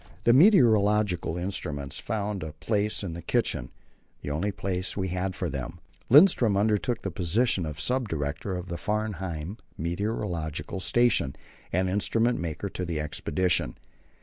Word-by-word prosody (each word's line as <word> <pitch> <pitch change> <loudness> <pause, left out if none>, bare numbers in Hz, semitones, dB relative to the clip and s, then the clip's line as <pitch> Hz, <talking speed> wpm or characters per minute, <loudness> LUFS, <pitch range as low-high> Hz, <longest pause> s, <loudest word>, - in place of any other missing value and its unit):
The 120 - +5
meteorological 105 - +4
instruments 75 -7 -3
found 105 -2 -3
a 80 -1 -6
place 105 +5 -1
in 90 -4 -4
the 85 - -6
kitchen - - 0 0.5
the 70 - -3
only 90 +8 -1
place 95 -1 -3
we 95 -1 -1
had 90 +1 -2
for 90 - -2
them. 70 +3 -5 0.3
Lindström 130 - +6
undertook 110 +3 +1
the 95 - -3
position 90 +1 +1
of 75 -1 -6
sub 125 +6 0
director 75 +4 -3
of 90 0 -6
the 85 -1 -4
Framheim 95 -3 -3 0.2
meteorological 85 -2 -3
station 105 - +2 0.4
and 95 +2 +1
instrument 115 +5 +1
maker 85 +3 -3
to 90 - -5
the 85 -3 -2
expedition. 75 -1 0
95 Hz, 145 wpm, -27 LUFS, 85-105 Hz, 0.5 s, Lindström